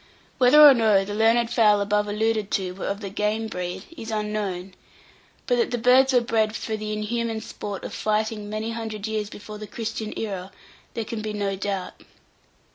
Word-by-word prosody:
Whether 255 +4 +6
or 280 - +9
no 215 -5 +3
the 205 - -5
learned 230 +2 +3
fowl 210 -4 +4
above 210 +1 +1
alluded 215 0 0
to 185 -2 0
were 185 +1 -6
of 200 +2 -3
the 200 -2 -6
"game" 210 +2 -1
breed, 180 -2 -5
is 225 -7 -8
unknown; 210 -4 -3 0.7
but 245 - +1
that 235 - +2
the 245 - -1
birds 255 +3 +5
were 250 -2 +4
bred 220 -2 0
for 220 - -3
the 215 0 -5
inhuman 225 +1 -2
sport 205 -2 -7
of - - -6
fighting 215 0 -1
many 215 +2 -3
hundred 220 -2 -5
years 215 -2 -2
before 210 0 -9
the 215 - -7
Christian 220 0 -4
era, 195 -3 -4 0.4
there 230 - -2
can 220 0 -5
be 215 0 -4
no 200 -1 -1
doubt. 195 -1 -4
215 Hz, 190 wpm, -24 LUFS, 205-225 Hz, 0.7 s, or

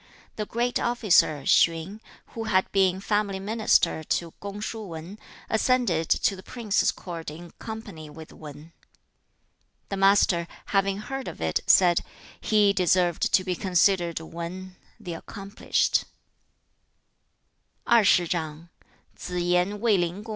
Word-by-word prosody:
The 210 -1 -4
great 240 +1 -1
officer, 210 - +2
Hsien, 170 +6 +2 0.3
who 225 -1 -6
had 190 -3 +1
been 190 -1 +2
family 205 -1 -1
minister 210 -5 +1
to 165 +2 -2
Kung 200 0 -6
shu 220 +1 -5
Wan, 175 +1 -9 0.3
ascended 220 -8 +1
to 195 - +2
the 185 - -11
prince's 215 -1 0
court 170 -4 -7
in 170 +3 -11
company 205 -9 -8
with 160 +1 -12
Wan. 150 +1 -12
2. - - -35 1.0
The 195 - -3
Master, 195 -3 +3 0.3
having 195 0 +2
heard 265 +5 -6
of - - -7
it, 80 -1 0
said, 175 -2 +5 0.4
'He 210 -2 +3
deserved 180 -2 +1
to 185 - +3
be 185 -1 -2
considered 180 -2 +1
WAN 170 +3 -8 0.2
(the 175 - -6
accomplished).' 195 +5 -1
190 Hz, 110 wpm, -25 LUFS, 170-210 Hz, 1.0 s, said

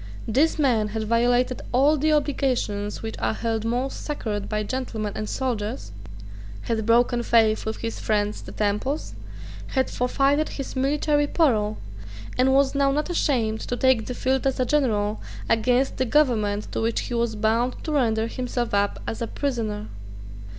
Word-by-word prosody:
This 275 +9 +2
man 245 -8 +2
had 220 +1 -3
violated 245 +3 +2
all 275 +5 +4
the 310 +1 +1
obligations 255 -9 0
which 220 0 -4
are - - 0
held 225 -1 -2
most 245 +4 -2
sacred 215 -9 -3
by 215 0 -1
gentlemen 220 -3 -3
and 215 - -4
soldiers, 210 - -3 0.7
had 220 -2 -2
broken 240 +1 +3
faith 220 -2 +3
with 220 - -2
his 230 - -4
friends 210 -1 0
the - - -10
Temples, 210 +8 -1 0.6
had 260 0 +1
forfeited 275 +4 +1
his 275 -1 -6
military 290 +2 +1
parole, 220 -10 +2 0.6
and 260 +1 +3
was 270 0 +3
now 280 -1 +3
not 300 +5 -1
ashamed 230 -10 +1
to 245 - -3
take 260 -4 +3
the 250 - -4
field 265 +2 0
as 265 - -1
a 255 - +2
general 220 -7 +1 0.3
against 245 +4 +2
the 260 - +1
government 225 -7 +1
to - - -2
which 230 +1 0
he - - -5
was 235 -2 0
bound 225 +4 +1
to 315 - -3
render 225 -6 +2
himself 240 0 -3
up 200 0 +1
as 225 - -4
a 230 - -1
prisoner. 225 -7 -2
240 Hz, 165 wpm, -24 LUFS, 220-270 Hz, 0.7 s, all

